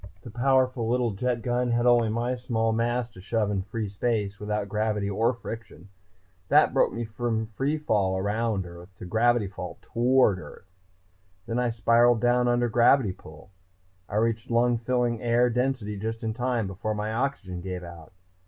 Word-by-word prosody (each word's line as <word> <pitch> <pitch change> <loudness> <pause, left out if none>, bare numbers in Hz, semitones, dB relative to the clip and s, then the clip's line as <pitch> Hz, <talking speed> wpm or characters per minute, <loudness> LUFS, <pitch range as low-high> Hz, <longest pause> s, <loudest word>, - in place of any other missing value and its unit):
The 120 - -9
powerful 130 -1 +1
little 120 -1 +1
jet 120 +3 -2
gun 125 +1 0
had 120 0 +1
only 120 -2 +4
my 120 +3 -1
small 115 -2 -1
mass 120 +1 0
to 95 - -14
shove 105 +1 -1
in 100 -2 -1
free 105 +2 -4
space, 100 -1 -2
without 105 -1 -2
gravity 105 0 -1
or 110 +4 +1
friction. 115 -6 -9 0.6
That - - +5
broke - - +3
me 120 0 -4
from 110 0 -3
free 145 +3 0
fall 100 -10 0
around 105 0 -1
Earth 85 +1 -11
to - - -9
gravity 115 +3 +2
fall 95 -2 -7
toward 120 -4 +2
Earth. 90 - -12 0.8
"Then 115 +1 -2
I 125 -1 +1
spiraled 115 +1 +3
down 125 +1 +2
under 120 0 +2
gravity 120 -1 +4
pull. 80 +3 -15 0.6
I - - -5
reached 115 +2 0
lung 120 0 +2
filling 120 -1 0
air 120 +1 +2
density 125 -4 -1
just 115 +2 -4
in 110 -1 -1
time, 125 -2 -1
before 100 +3 -3
my 105 +1 -3
oxygen 110 -8 -3
gave 90 -1 -5
out. 85 -2 -11
115 Hz, 170 wpm, -26 LUFS, 105-120 Hz, 0.8 s, That